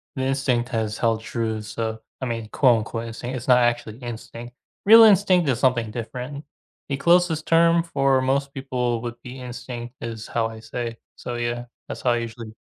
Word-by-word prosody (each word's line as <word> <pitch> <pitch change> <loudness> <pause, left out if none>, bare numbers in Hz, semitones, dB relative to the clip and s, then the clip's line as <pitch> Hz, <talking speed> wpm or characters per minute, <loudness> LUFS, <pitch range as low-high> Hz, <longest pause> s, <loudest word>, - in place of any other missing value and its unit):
the 130 - -2
instinct 130 -2 0
has 110 -3 -2
held 115 -1 +1
true, 110 -1 -3
so 110 +1 -4 0.2
I - - -1
mean, 115 -2 -4
quote-unquote 115 -3 +2
"instinct". 120 +3 -5
It's 120 - -8
not 125 -1 +6
actually 120 -2 0
instinct. 120 0 -8 0.3
Real 225 +2 +10
instinct 190 -5 +5
is 125 -2 +1
something 120 -4 +2
different. 125 +5 -6 0.5
The 140 - -1
closest 170 0 +3
term 165 0 +4
for 135 -5 +2
most 140 +1 0
people 125 -3 -2
would 120 -1 -5
be 130 +1 -8
instinct 120 0 -7
is 115 -1 -6
how 115 -1 0
I 110 0 -9
say. 115 +1 -5 0.2
So, 120 - -6
yeah, 120 0 -2 0.2
that's - - -6
how 125 - +2
I 120 - +2
usually, 115 -1 -6
120 Hz, 180 wpm, -23 LUFS, 115-135 Hz, 0.5 s, Real